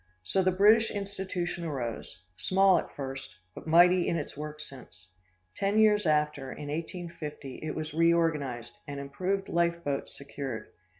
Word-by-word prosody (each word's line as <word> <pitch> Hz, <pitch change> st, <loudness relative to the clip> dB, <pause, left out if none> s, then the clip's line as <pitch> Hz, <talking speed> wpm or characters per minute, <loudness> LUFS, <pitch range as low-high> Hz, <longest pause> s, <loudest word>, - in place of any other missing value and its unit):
So 190 Hz, -, +1 dB
the 185 Hz, -, +3 dB
British 215 Hz, +4 st, +5 dB
institution 190 Hz, -4 st, -3 dB
arose, 120 Hz, -, -5 dB
small 190 Hz, -, +4 dB
at -, -, -7 dB
first, 135 Hz, -7 st, -6 dB, 0.2 s
but -, -, -10 dB
mighty 175 Hz, +2 st, +6 dB
in -, -, +1 dB
its 150 Hz, -, -5 dB
work 150 Hz, +1 st, -6 dB
since. 125 Hz, -10 st, -11 dB, 0.5 s
Ten 200 Hz, +2 st, 0 dB
years 210 Hz, -3 st, +5 dB
after, 150 Hz, -3 st, +1 dB
in 145 Hz, -, -7 dB
1850, 160 Hz, -4 st, -6 dB
it 155 Hz, -1 st, -4 dB
was 155 Hz, 0 st, -4 dB
reorganized, 155 Hz, -8 st, +1 dB
and 140 Hz, -1 st, -5 dB
improved 185 Hz, +8 st, -2 dB
life 170 Hz, 0 st, +1 dB
boats 140 Hz, -2 st, -3 dB
secured. 135 Hz, -5 st, -6 dB
160 Hz, 145 wpm, -29 LUFS, 140-180 Hz, 0.5 s, mighty